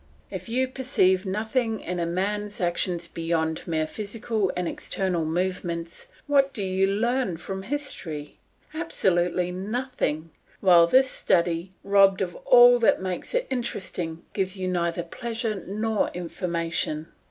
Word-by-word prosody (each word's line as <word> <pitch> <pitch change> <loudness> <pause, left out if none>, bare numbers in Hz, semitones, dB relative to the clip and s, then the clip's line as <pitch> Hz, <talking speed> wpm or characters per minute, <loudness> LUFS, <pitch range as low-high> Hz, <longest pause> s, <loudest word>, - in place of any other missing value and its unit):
If 185 +3 -6
you 260 +3 +1
perceive 215 -8 +1
nothing 220 +3 -1
in 180 0 -4
a 170 - 0
man's 205 +4 -2
actions 175 -1 -1
beyond 165 -1 -1
merely 160 -2 0
physical 215 +2 -2
and 180 -1 -1
external 180 -3 -2
movements, 170 0 -3 0.2
what 275 -2 +3
do 205 - -3
you 190 0 +2
learn 220 -1 0
from 190 +3 -5
history? 190 - -5 0.3
Absolutely 180 - 0
nothing; 195 - -2 0.3
while 175 -3 +6
this 260 +8 +5
study, 170 +1 +1
robbed 195 -1 +5
of 175 -2 -5
all 245 0 +8
that 230 - +4
makes 185 - -4
it - - +1
interesting, 185 -9 -3
gives 190 -1 -1
you 185 -1 -2
neither 170 -1 0
pleasure 225 +2 -4
nor 215 +2 0
information. 170 -3 -2
190 Hz, 130 wpm, -26 LUFS, 170-225 Hz, 0.3 s, all